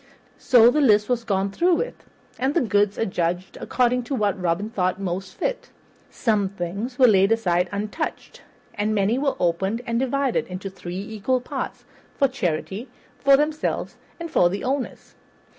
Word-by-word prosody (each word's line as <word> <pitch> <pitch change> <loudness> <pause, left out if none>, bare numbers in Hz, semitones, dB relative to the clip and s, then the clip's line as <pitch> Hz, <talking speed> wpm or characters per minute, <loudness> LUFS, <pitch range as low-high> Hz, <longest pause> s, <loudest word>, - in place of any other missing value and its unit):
So 240 -2 +6
the 300 - +2
list 210 -5 +4
was 245 -2 0
gone 195 -3 0
through 345 - +3
with, - - -5 0.3
and 265 +3 0
the 345 - +4
goods 205 -4 +1
adjudged 180 -3 -2
according 250 0 +1
to 270 - -2
what 205 -5 0
Robin 180 +5 -1
thought 185 -2 0
most 190 0 -4
fit. - - -3 0.4
Some 210 -5 0
things 200 +7 -5
were 260 - +6
laid 195 -3 +5
aside 180 -5 +1
untouched, 210 +10 -4 0.3
and 215 +1 -1
many 210 +5 +2
were 275 -1 0
opened 190 +7 0
and 230 0 0
divided 265 0 0
into 185 +1 -6
three 180 -1 -7
equal 220 +5 -1
parts, 250 - -6 0.3
for 275 - +4
charity, 200 - -3 0.3
for 275 0 +6
themselves, 300 +1 -1 0.2
and 335 -1 -6
for 175 - +4
the 195 +3 -4
owners. 265 0 -3
215 Hz, 160 wpm, -23 LUFS, 190-255 Hz, 0.4 s, So